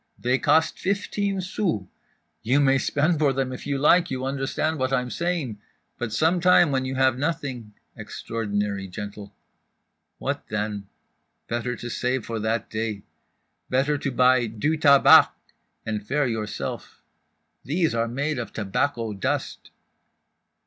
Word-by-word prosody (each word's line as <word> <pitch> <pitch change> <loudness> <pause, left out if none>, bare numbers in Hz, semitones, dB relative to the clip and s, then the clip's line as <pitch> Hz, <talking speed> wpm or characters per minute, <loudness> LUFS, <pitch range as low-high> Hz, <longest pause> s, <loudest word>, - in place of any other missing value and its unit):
They 125 +2 +1
cost 155 +2 +2
fifteen 200 0 -1
sous, 180 - -2 0.6
you 130 +6 +2
may 135 -1 +4
spend 155 +4 +1
for 145 -3 +3
them 130 -1 -2
if 125 - -8
you 140 -1 0
like, 170 +5 +4
you 130 0 -3
understand 140 +3 -1
what 130 0 0
I'm 125 -2 0
saying? 165 - -2 0.4
But 120 -2 -3
some 160 +9 +2
time 175 -3 +5
when 130 -1 0
you 130 0 -3
have 130 -1 +2
nothing" 140 -8 -3 0.2
(extraordinary 105 -3 -3
gently) 100 +2 -7 0.9
"what - - -4
then? 105 -1 -3 0.6
Better 120 +1 -2
to 120 - -7
save 125 0 -1
for 115 -1 -4
that 110 +2 -1
day… 110 -2 -3 0.7
better 135 +3 +2
to 140 - -2
buy 125 -1 +4
du 115 +9 -1
tabac 140 -3 +7 0.6
and 110 -2 -3
faire 140 +7 0
yourself; 110 -3 -5 0.6
these 165 +3 0
are 115 0 0
made 140 +4 -2
of 120 - -5
tobacco 115 +2 -1
dust." 95 - -3
130 Hz, 140 wpm, -24 LUFS, 110-145 Hz, 0.9 s, tabac